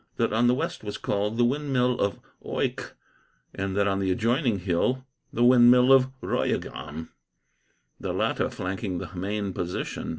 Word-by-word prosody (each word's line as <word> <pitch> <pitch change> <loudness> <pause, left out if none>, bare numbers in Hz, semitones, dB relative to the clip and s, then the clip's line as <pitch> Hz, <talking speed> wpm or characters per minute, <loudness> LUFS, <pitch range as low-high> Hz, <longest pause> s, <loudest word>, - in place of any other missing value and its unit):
That - - 0
on 115 +2 +3
the 125 - +4
west 165 +1 -4
was 105 -1 -5
called 105 +2 -2
the 120 - +4
windmill 125 -2 0
of 100 0 0 0.2
Oycke, - - -3 0.6
and 95 0 -3
that 100 0 +3
on 95 -1 0
the 95 -1 0
adjoining 120 - +1
hill 100 +8 0 0.3
the 120 - 0
windmill 125 +1 +7
of 130 -1 +5 0.2
Royegham, 80 +2 -3 0.9
the - - -3
latter - - 0
flanking 95 0 -4
the - - -7
main 100 +1 -3
position. 90 0 -4
105 Hz, 155 wpm, -26 LUFS, 95-125 Hz, 0.9 s, windmill